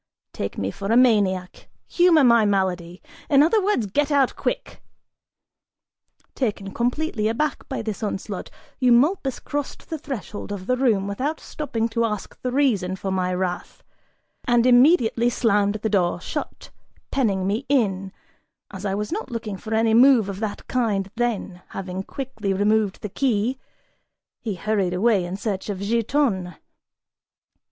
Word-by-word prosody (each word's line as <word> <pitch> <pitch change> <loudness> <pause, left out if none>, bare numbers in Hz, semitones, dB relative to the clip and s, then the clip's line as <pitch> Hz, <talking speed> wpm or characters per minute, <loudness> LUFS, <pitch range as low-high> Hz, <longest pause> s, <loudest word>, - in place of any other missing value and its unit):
Take 100 - -4
me 95 0 -2
for 200 - -4
a 230 - +5
maniac, 200 -7 +2 0.2
humor 345 -4 +4
my 235 -3 +6
malady: 185 -3 -1 0.3
in 285 -1 +6
other 405 +6 +3
words, 390 - +1
get 285 +9 0
out 280 -3 +2
quick!" - - -4 1.5
Taken 205 -6 -3
completely 245 -2 -1
aback 265 +8 -2
by 265 -4 -3
this 215 -1 -4
onslaught, 200 -2 -4 0.3
Eumolpus 265 +3 +3
crossed 290 +2 -5
the 320 - -3
threshold 210 - -6
of 195 -2 -5
the 255 - +1
room 225 -7 +1
without 270 +10 -2
stopping 230 -7 -3
to 230 0 0
ask 210 -3 -4
the 250 - -2
reason 220 -10 +1
for 190 +1 -4
my 185 -1 0
wrath, 180 -1 -3 0.6
and 240 -2 +3
immediately 245 -2 +5
slammed 205 -4 +2
the 215 +1 -2
door 180 -4 +1
shut, - - -6 0.4
penning 200 -8 +1
me 210 +7 -1
in, 195 -8 +1 0.6
as 195 +1 -7
I 195 - -1
was 210 +5 -3
not 420 +6 -3
looking 230 -4 -4
for 215 +3 -9
any 225 0 +3
move 240 -3 +6
of 195 -1 -5
that 215 -2 -4
kind 205 -6 0
then, 225 -6 -2 0.2
having 185 -1 -4
quickly 220 -3 -4
removed 210 0 +1
the 210 - -3
key, 245 +2 0 0.8
he 215 -5 -4
hurried 195 -2 0
away 205 0 +3
in 180 +2 -5
search 205 -1 -3
of 200 - -2
Giton. 215 - 0
220 Hz, 150 wpm, -23 LUFS, 195-255 Hz, 1.5 s, my